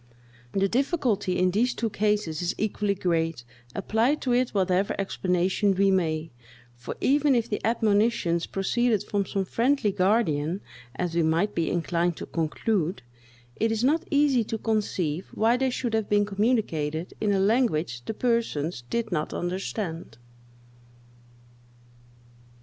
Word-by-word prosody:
The 195 0 +2
difficulty 235 - 0
in 185 0 +3
these 235 +6 +1
two 225 -2 -2
cases 210 -7 0
is 175 - -1
equally 210 -1 0
great, 165 -7 -1 0.3
apply 225 +7 +1
to 260 -5 -1
it 250 0 +2
whatever 190 0 +1
explanation 190 +1 +1
we 195 +1 +3
may; 160 -3 0 0.4
for 120 -1 -7
even 285 0 +3
if 235 -2 +1
the 210 - -3
admonitions 215 -5 +1
proceeded 215 +2 +1
from 200 -2 -1
some 195 -1 -1
friendly 235 +1 +1
guardian, 185 -4 +1 0.3
as 175 +3 -2
we 170 - +2
might 165 +6 +1
be 165 - 0
inclined 170 0 0
to - - -6
conclude, 165 - -1 0.5
it 225 0 +1
is 225 +1 -1
not 320 +7 +2
easy 285 -5 +3
to 225 - -3
conceive 195 -7 -1
why 225 +2 +3
they 260 +1 +1
should 245 -2 -3
have 220 -2 0
been 205 0 +3
communicated 195 -7 -1
in 210 -1 +2
a 195 - +2
language 190 - +1
the 220 - -4
persons 220 - -1
did 230 -2 -2
not 155 -3 -2
understand. 175 - -4
200 Hz, 140 wpm, -26 LUFS, 175-230 Hz, 0.5 s, in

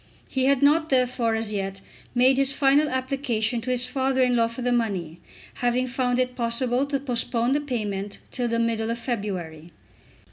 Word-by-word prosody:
He 260 -1 -1
had 275 0 +3
not 315 +3 +4
therefore 250 -3 +2
as 220 -1 -2
yet 195 -1 -3 0.4
made 260 +2 +4
his 275 0 +4
final 280 +2 +3
application 255 -4 -1
to 245 - -5
his 250 -1 0
father 265 0 +1
in 250 -1 +2
law 230 -1 +3
for 230 +2 -7
the 245 - +1
money, 190 -9 -1 0.4
having 245 +1 +1
found 245 0 -1
it 250 0 0
possible 245 +2 0
to 280 -1 -1
postpone 245 -2 -1
the 290 +2 +2
payment 205 -7 -3
till 245 -1 -1
the 230 0 0
middle 230 -1 0
of 230 - -1
February. 185 - -4
245 Hz, 180 wpm, -25 LUFS, 225-260 Hz, 0.4 s, not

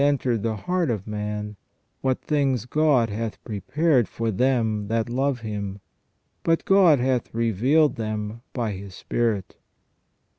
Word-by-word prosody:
entered 130 -5 +2
the 115 0 -1
heart 175 - -1
of 105 -4 -2
man, 105 0 -4 0.5
what 130 -1 +1
things 135 -6 +1
God 135 -5 +2
hath 110 +1 -4
prepared 125 - +1
for 115 -1 -2
them 110 -2 +1
that 115 +1 0
love 130 +1 0
Him. 100 -3 -4 0.6
But 165 0 +1
God 190 -6 +6
hath 125 -1 0
revealed 125 +7 +2
them, 110 0 -4
by 115 -4 -2
His 95 -1 -8
Spirit." 110 -5 -1
115 Hz, 135 wpm, -24 LUFS, 105-135 Hz, 0.6 s, God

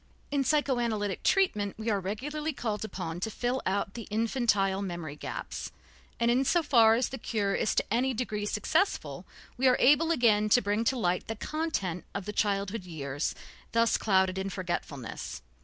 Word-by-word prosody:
In 285 -1 +2
psychoanalytic 240 - 0
treatment 210 - +2
we 220 +1 -1
are 205 - +1
regularly 295 +11 -3
called 220 -5 -3
upon 175 -6 -5
to 205 - -2
fill 245 +4 -1
out 195 0 -1
the 230 -3 -7
infantile 210 -3 +1
memory 175 -6 -5
gaps, - - -6 0.5
and 235 0 +3
in 255 +3 +3
so 340 +5 +2
far 230 -6 +6
as 245 +2 0
the 265 - -6
cure 205 -3 -1
is 215 - 0
to - - 0
any 255 +3 +2
degree 215 -4 -2
successful, 315 - 0 0.3
we 260 +2 +3
are 250 - +5
able 295 +5 +5
again 220 -8 +3
to 245 - +6
bring 205 0 0
to 265 - +2
light 180 -5 0
the 225 - -3
content 220 - -2
of 200 -2 -3
the 210 - -4
childhood 200 0 0
years 145 -4 -3 0.4
thus 230 0 +3
clouded 190 -2 +2
in 190 +1 -2
forgetfulness. 175 - -5
215 Hz, 175 wpm, -29 LUFS, 195-250 Hz, 0.5 s, far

